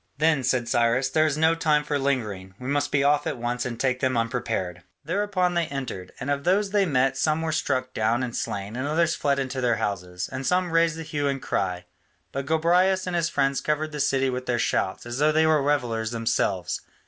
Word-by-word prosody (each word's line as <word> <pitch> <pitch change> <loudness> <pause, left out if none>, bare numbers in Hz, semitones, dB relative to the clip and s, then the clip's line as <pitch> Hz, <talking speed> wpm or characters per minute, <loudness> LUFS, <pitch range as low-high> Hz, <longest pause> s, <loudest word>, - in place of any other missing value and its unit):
"Then," 150 -2 +2
said 125 -1 +1
Cyrus, 120 +3 +2
"there 155 +3 +3
is 150 -1 -1
no 160 +1 +4
time 155 -3 +2
for 150 -1 -1
lingering; 105 -9 -2
we 125 - -8
must 145 +1 0
be 140 -1 +2
off 145 +1 +2
at 140 - -2
once 120 +1 -2
and 120 -2 -6
take 130 -1 +1
them 130 -2 +1
unprepared." 115 -7 -2 0.2
Thereupon 185 +1 0
they 170 -2 0
entered: 130 -10 -5
and 140 +3 -2
of 140 0 -1
those 195 +3 +2
they 200 -2 +3
met 135 -2 +2
some 155 +3 +1
were 160 - -1
struck 130 -4 -1
down 115 +3 +1
and 120 -2 -4
slain, 100 +2 -4
and 130 +3 -2
others 165 +2 +2
fled 140 -1 0
into 130 -1 -2
their 120 -2 +2
houses, 90 -4 -3
and 130 0 -5
some 180 +3 +1
raised 165 -1 +3
the 165 - -5
hue 145 -2 -2
and 140 -1 -1
cry, 90 -6 -2 0.5
but 135 0 -4
Gobryas 180 +4 +3
and 180 -1 -2
his 170 -1 +1
friends 135 -1 +1
covered 155 +1 -1
the 150 -2 -1
cry 135 0 +1
with 125 0 -4
their 120 -1 +1
shouts, 95 -4 -1
as 120 +2 -5
though 150 +1 +4
they 160 +1 +3
were 155 -2 +4
revellers 120 -6 0
themselves. 110 -6 -1
135 Hz, 220 wpm, -25 LUFS, 120-155 Hz, 0.5 s, no